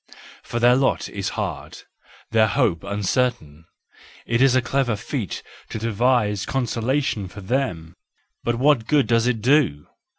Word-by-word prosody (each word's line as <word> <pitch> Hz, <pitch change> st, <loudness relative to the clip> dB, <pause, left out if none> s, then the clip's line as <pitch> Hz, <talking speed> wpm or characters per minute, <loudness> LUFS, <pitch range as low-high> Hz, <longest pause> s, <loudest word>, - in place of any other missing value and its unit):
For 120 Hz, -, -4 dB
their 120 Hz, +1 st, +5 dB
lot 135 Hz, 0 st, +1 dB
is -, -, -3 dB
hard, -, -, -5 dB, 0.5 s
their 110 Hz, -1 st, +4 dB
hope 105 Hz, -7 st, +1 dB
un¬ 100 Hz, 0 st, -4 dB
certain; 95 Hz, -, -1 dB, 0.6 s
it 115 Hz, +1 st, 0 dB
is 135 Hz, -1 st, +5 dB
a -, -, +5 dB
clever 130 Hz, -3 st, 0 dB
feat 105 Hz, 0 st, -5 dB, 0.3 s
to -, -, -5 dB
devise 110 Hz, -2 st, +1 dB
consolation 125 Hz, -3 st, -1 dB
for 100 Hz, +3 st, -11 dB
them. 95 Hz, -8 st, -2 dB, 0.5 s
But 120 Hz, -, 0 dB
what 130 Hz, -2 st, +2 dB
good 150 Hz, -3 st, +3 dB
does 115 Hz, 0 st, +2 dB
it 115 Hz, -3 st, 0 dB
do! 125 Hz, -, +2 dB
120 Hz, 145 wpm, -22 LUFS, 105-130 Hz, 0.6 s, their